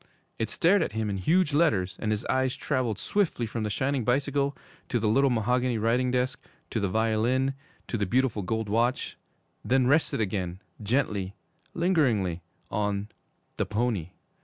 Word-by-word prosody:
'_ - - -26 0.4
It 115 - -1
stared 185 +4 +3
at - - -1
him 110 -2 -1
in 100 - -2
huge 160 - +2
letters, 105 - +2
and 110 - -2
his 110 +1 -1
eyes 130 -1 +1
traveled 130 -7 -1
swiftly 190 - 0
from 115 +1 -4
the 105 - -1
shining 130 +4 0
bicycle 140 +3 0 0.3
to 120 - +1
the 110 - 0
little 135 +6 +4
mahogany 125 +1 +1
writing 120 +4 +1
desk, 125 0 -1 0.3
to - - 0
the 100 - 0
violin, 115 +6 +1 0.3
to 115 - -2
the 100 - 0
beautiful 125 -1 +1
gold 110 +3 -2
watch 120 +5 0 0.5
then 130 0 +3
rested 145 +1 +2
again 95 -4 -2 0.2
gently, 105 -4 0 0.4
lingeringly, 125 - +1 0.3
on 105 0 -1 0.5
THE - - 0
PONY. 105 -6 -1
120 Hz, 160 wpm, -27 LUFS, 105-130 Hz, 0.5 s, little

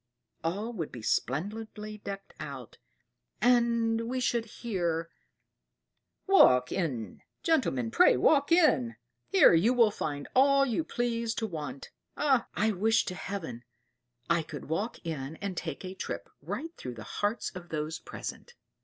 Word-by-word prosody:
All 205 +8 -2
would 165 -8 -4
be 120 - -9
splendidly 210 - -2
decked 195 -1 -7
out, - - -8 0.6
and 235 -2 +2
we 255 +1 -1
should 235 -2 +1
hear, 175 -8 -2 1.1
'Walk 125 - +6
in, 125 - -3 0.2
gentlemen, 135 - +1
pray - - +6
walk 285 - +3
in; 220 - +4 0.3
here 195 - +7
you 210 +10 +4
will 230 -3 +5
find 145 -7 -4
all 275 +1 +5
you 260 +4 0
please 235 -4 -1
to 225 - -1
want.' 150 -8 -6 0.3
Ah! 270 -5 +2
I 220 +1 +2
wish 220 +3 +2
to 185 - -3
Heaven 170 -11 -5 0.6
I 170 0 +3
could 150 -2 -8
walk 205 +9 -2
in 150 -2 -4
and 195 +1 -4
take 165 0 -5
a 185 - -5
trip 190 - -6
right 330 +1 -5
through 125 -1 -6
the 110 - -8
hearts 205 - -2
of 180 -2 -10
those 155 +1 -3
present!" 480 - -8
200 Hz, 145 wpm, -30 LUFS, 160-235 Hz, 1.1 s, here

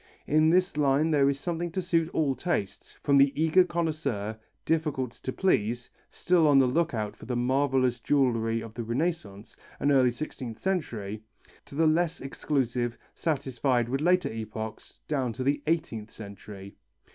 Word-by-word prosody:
In 155 +1 +4
this 180 -1 +2
line 145 +2 +3
there 140 -2 +4
is 140 0 -1
something 175 +2 -2
to 190 - -1
suit 165 -2 +1
all 150 -5 +1
tastes, 130 - -3
from 140 -1 +4
the 140 0 +6
eager 160 +4 +5
connoisseur, 155 - -2 0.3
difficult 150 -6 0
to 130 - -6
please, 120 - 0 0.2
still 175 -3 +2
on 145 -2 +5
the 135 - +6
look 160 +7 +1
out 105 -2 -3
for 110 - -13
the 125 - -2
marvellous 130 0 +1
jewellery 115 -5 +1
of 115 -1 -9
the 120 - -5
Rennaissance 115 - -3 0.2
and 145 - +2
early 130 -3 +5
sixteenth 120 -3 -6
century, 110 - -3 0.4
to - - -12
the 160 +2 +3
less 165 +2 +2
exclusive, 125 -3 -2 0.2
satisfied 130 -5 0
with 135 +3 -1
later 180 -4 +2
epochs 110 0 -7
down 130 -6 -1
to 130 - -4
the 140 +2 +1
eighteenth 155 -10 -1
century. 100 -2 -10
135 Hz, 160 wpm, -28 LUFS, 115-160 Hz, 0.4 s, the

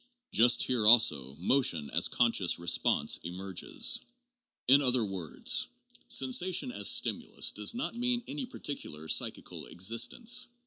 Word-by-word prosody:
Just 120 +1 +3
here 120 -5 -1
also, 70 - +4
motion 85 - 0
as - - +2
conscious 115 -7 0
response 85 -1 0
emerges. 90 +2 0 0.7
In 135 +3 +5
other 125 -4 +1
words, 95 -6 -2 0.4
sensation 175 - +1
as - - +1
stimulus - - +1
does - - +1
not 245 - -4
mean 245 0 -2
any 260 - -6
par 250 - -12
ticular 80 - -6
psychical - - -2
existence. 120 - +1
120 Hz, 125 wpm, -29 LUFS, 90-145 Hz, 0.7 s, In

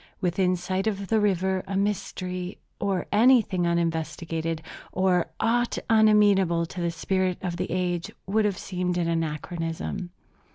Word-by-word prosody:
Within 185 0 +1
sight 185 +3 -2
of 200 -2 -2
the 225 - +3
river 190 -2 +1
a 195 0 -2
mystery, 185 -2 -2 0.2
or 195 -3 0
anything 210 -6 +4
uninvestigated, 165 -1 -1 0.3
or 185 -2 +2
aught 240 +1 +1
unamenable 205 -6 +5
to 175 +2 -7
the 170 - +1
spirit 185 +1 0
of 175 -2 -2
the 180 - -3
age, 175 -2 -1 0.2
would 210 +3 +2
have 200 -3 0
seemed 180 -1 -2
an 170 -1 0
anachronism. 165 +2 -3
185 Hz, 135 wpm, -26 LUFS, 170-200 Hz, 0.3 s, unamenable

